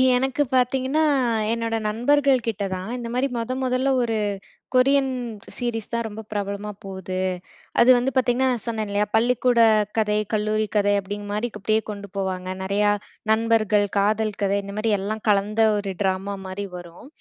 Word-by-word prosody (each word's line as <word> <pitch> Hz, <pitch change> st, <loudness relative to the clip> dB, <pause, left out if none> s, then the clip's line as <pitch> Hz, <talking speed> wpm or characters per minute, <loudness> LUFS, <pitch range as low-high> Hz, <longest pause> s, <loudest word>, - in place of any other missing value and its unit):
எனக்கு 265 Hz, +2 st, 0 dB
பார்த்தீங்கன்னா, 260 Hz, +4 st, +2 dB, 0.5 s
என்னோட 230 Hz, 0 st, -1 dB
நண்பர்கள்கிட்ட 245 Hz, -2 st, +2 dB
தான். 185 Hz, +2 st, -5 dB
இந்தமாரி 245 Hz, +2 st, -1 dB
மொத 230 Hz, +2 st, -3 dB
மொதல்ல 260 Hz, +1 st, +1 dB
ஒரு 225 Hz, -2 st, 0 dB, 0.6 s
கொரியன் 270 Hz, +1 st, +4 dB, 0.5 s
சீரிஸ் 235 Hz, -3 st, -3 dB
தான் 235 Hz, 0 st, 0 dB
ரொம்ப 220 Hz, 0 st, -7 dB
பிரபலமா 205 Hz, 0 st, -3 dB
போகுது. 190 Hz, -1 st, -5 dB, 0.6 s
அது 235 Hz, -, +6 dB
வந்து 250 Hz, +2 st, 0 dB
பார்த்தீங்கன்னா, 255 Hz, 0 st, +2 dB
நான் 235 Hz, -, -4 dB
சொன்னேன் 220 Hz, -3 st, -2 dB
இல்லயா! 205 Hz, +1 st, +1 dB
பள்ளிக்கூட 245 Hz, +1 st, +3 dB, 0.4 s
கதை, 210 Hz, -1 st, +2 dB, 0.2 s
கல்லூரி 215 Hz, 0 st, +1 dB
கதை 205 Hz, 0 st, +3 dB
அப்பிடிங்கிறமாரி 205 Hz, +3 st, -4 dB
அப்பிடியே 215 Hz, +2 st, +1 dB
கொண்டு 200 Hz, -1 st, -8 dB
போவாங்க. 185 Hz, -1 st, -2 dB, 0.2 s
நெறையா 205 Hz, +2 st, +2 dB, 0.4 s
நண்பர்கள், 220 Hz, -2 st, +3 dB
காதல் 215 Hz, +1 st, +1 dB
கதை 200 Hz, 0 st, +2 dB
இந்தமாரி 210 Hz, +3 st, -2 dB
எல்லாம் 215 Hz, +2 st, -4 dB
கலந்த 210 Hz, +2 st, +2 dB, 0.2 s
ஒரு 200 Hz, -2 st, -3 dB
டிராமா 195 Hz, +1 st, -1 dB
மாரி 190 Hz, +2 st, -4 dB
வரும். 175 Hz, +6 st, -12 dB
215 Hz, 140 wpm, -23 LUFS, 200-245 Hz, 0.6 s, அது